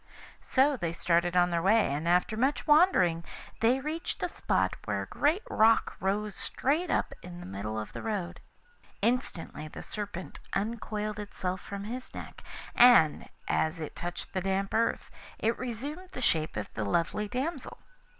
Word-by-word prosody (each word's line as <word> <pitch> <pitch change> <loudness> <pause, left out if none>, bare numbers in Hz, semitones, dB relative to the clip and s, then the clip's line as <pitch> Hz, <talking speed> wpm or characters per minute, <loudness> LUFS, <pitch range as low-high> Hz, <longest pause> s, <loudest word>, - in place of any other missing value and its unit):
So 275 +2 +3
they 170 -6 -2
started 170 +1 +2
on 175 0 +4
their 170 -1 +1
way, 200 -4 +4
and 150 +4 -2
after 180 +5 +3
much 265 +6 +1
wandering 295 - +5 0.4
they 240 +4 +3
reached 310 +5 -4
a - - +2
spot - - 0
where - - -1
a - - -7
great 315 +9 +1
rock 220 +1 +4
rose 205 +2 -1
straight 305 - 0
up - - 0
in 175 -1 -9
the - - -8
middle 105 +3 -4
of 110 - -7
the - - -6
road. 205 -6 -3 0.6
Instantly 220 - -1
the - - -9
Serpent 205 -4 -5
uncoiled 215 0 -2
itself 185 -3 -4
from 200 0 -6
his 245 +5 -6
neck, - - -8 0.3
and, 240 -11 +6 0.2
as 160 +2 +1
it 155 - -6
touched 175 +1 -5
the 190 - 0
damp 195 +1 -1
earth, 230 +1 0 0.3
it 225 +1 +1
resumed 280 +9 -5
the - - -5
shape 160 - +1
of 105 - -5
the 110 - -2
lovely 170 - 0
damsel. 270 +6 -3
205 Hz, 165 wpm, -30 LUFS, 175-250 Hz, 0.6 s, and